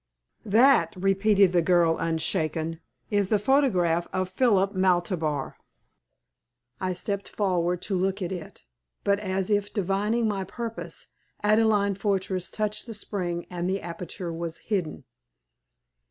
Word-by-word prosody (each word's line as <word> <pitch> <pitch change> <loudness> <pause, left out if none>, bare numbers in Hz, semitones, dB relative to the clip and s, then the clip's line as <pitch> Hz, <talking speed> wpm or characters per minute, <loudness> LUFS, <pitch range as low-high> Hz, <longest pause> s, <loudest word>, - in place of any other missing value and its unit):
"That," 220 -5 +5
repeated 195 +1 +3
the 175 -1 +3
girl, 170 -1 +3
unshaken, 160 0 0 0.3
"is 205 -2 +2
the 215 - +4
photograph 200 - +2
of 185 0 -1
Philip 200 -4 +2
Maltabar." 175 -6 0 1.2
I 185 -1 -1
stepped 200 +2 -3
forward 180 -3 0
to 195 - -1
look 190 +2 0
at 185 -2 -3
it, 175 -4 -7 0.4
but, 200 0 +2
as 190 -1 -2
if 205 0 +1
divining 210 +3 0
my 200 -2 -1
purpose, 230 +4 -6 0.3
Adelaide 210 -2 +3
Fortress 190 -3 -1
touched 215 +2 -2
the 225 - -5
spring 175 -5 -3
and 175 0 -2
the 195 +1 0
aperture 170 0 -5
was 165 0 -4
hidden. 190 -7 -3
190 Hz, 125 wpm, -26 LUFS, 175-205 Hz, 1.2 s, That